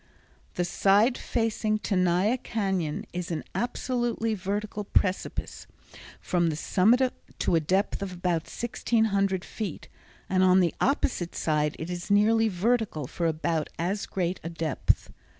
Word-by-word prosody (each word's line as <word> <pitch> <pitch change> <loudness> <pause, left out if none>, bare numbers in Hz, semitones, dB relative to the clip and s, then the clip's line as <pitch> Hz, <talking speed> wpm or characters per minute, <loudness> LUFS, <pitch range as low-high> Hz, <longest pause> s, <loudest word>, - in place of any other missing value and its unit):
The 175 - 0
side 200 +7 +3
facing 225 -3 0
Tenaya 185 +2 +2
Cañon 190 -10 -2
is 180 -1 -4
an 160 -3 -3
absolutely 240 +1 -1
vertical 205 +2 -3
precipice 195 -1 -1 0.5
from 175 -2 +1
the 155 - -2
summit 235 - +3 0.2
to - - 0
a - - +5
depth 190 +7 0
of 200 -1 -3
about 175 -2 -1
1600 200 -5 0
feet, 205 -8 -6 0.4
and 185 0 +2
on 185 0 +6
the 175 -3 +2
opposite 245 - 0
side 150 -1 0
it 160 +3 -5
is 175 +1 -5
nearly 220 +2 +4
vertical 210 - 0
for 170 +6 -2
about 160 0 -1
as 190 +5 -2
great 180 -1 -2
a 165 - -4
depth. 165 -3 -1
190 Hz, 135 wpm, -27 LUFS, 175-220 Hz, 0.5 s, on